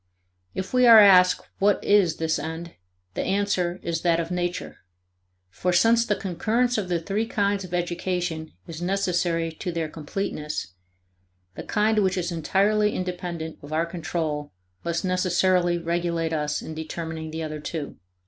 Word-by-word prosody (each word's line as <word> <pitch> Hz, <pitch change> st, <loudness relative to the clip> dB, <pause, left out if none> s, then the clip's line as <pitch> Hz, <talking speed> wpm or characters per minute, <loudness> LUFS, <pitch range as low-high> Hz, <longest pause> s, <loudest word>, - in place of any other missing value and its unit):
If 190 Hz, +4 st, -4 dB
we 250 Hz, -1 st, +5 dB
are 230 Hz, -1 st, +10 dB
asked 185 Hz, -3 st, +7 dB, 0.2 s
what 205 Hz, 0 st, +3 dB
is 195 Hz, -6 st, +4 dB
this 160 Hz, 0 st, -1 dB
end, 165 Hz, +1 st, -6 dB, 0.4 s
the -, -, -2 dB
answer 190 Hz, -3 st, 0 dB
is 165 Hz, -1 st, -2 dB
that 170 Hz, -1 st, +2 dB
of 165 Hz, +1 st, -3 dB
Nature. 175 Hz, 0 st, -3 dB, 0.7 s
For 180 Hz, -, -1 dB
since 230 Hz, +6 st, +4 dB
the 205 Hz, -, +2 dB
concurrence 220 Hz, +7 st, 0 dB
of 190 Hz, -3 st, -4 dB
the 175 Hz, -1 st, +1 dB
three 200 Hz, +6 st, -2 dB
kinds 200 Hz, -2 st, 0 dB
of 180 Hz, -, -9 dB
education 175 Hz, -2 st, -2 dB
is 165 Hz, 0 st, -8 dB
necessary 175 Hz, -3 st, 0 dB
to 180 Hz, +3 st, -5 dB
their 165 Hz, -2 st, -2 dB
completeness, 150 Hz, -, -4 dB, 0.8 s
the -, -, -7 dB
kind 215 Hz, 0 st, +1 dB
which 190 Hz, -2 st, +1 dB
is 175 Hz, -1 st, -1 dB
entirely 200 Hz, +6 st, +2 dB
independent 175 Hz, -3 st, -4 dB
of 145 Hz, -, -11 dB
our 160 Hz, +2 st, +1 dB
control 160 Hz, -3 st, -3 dB, 0.3 s
must 170 Hz, +1 st, -2 dB
necessarily 180 Hz, -1 st, +2 dB
regulate 170 Hz, -1 st, -1 dB
us 150 Hz, -1 st, -1 dB
in 160 Hz, -, -6 dB
determining 160 Hz, 0 st, -5 dB
the 160 Hz, +1 st, -4 dB
other 155 Hz, -1 st, -5 dB
two." 150 Hz, -1 st, -5 dB
175 Hz, 155 wpm, -25 LUFS, 160-195 Hz, 0.8 s, are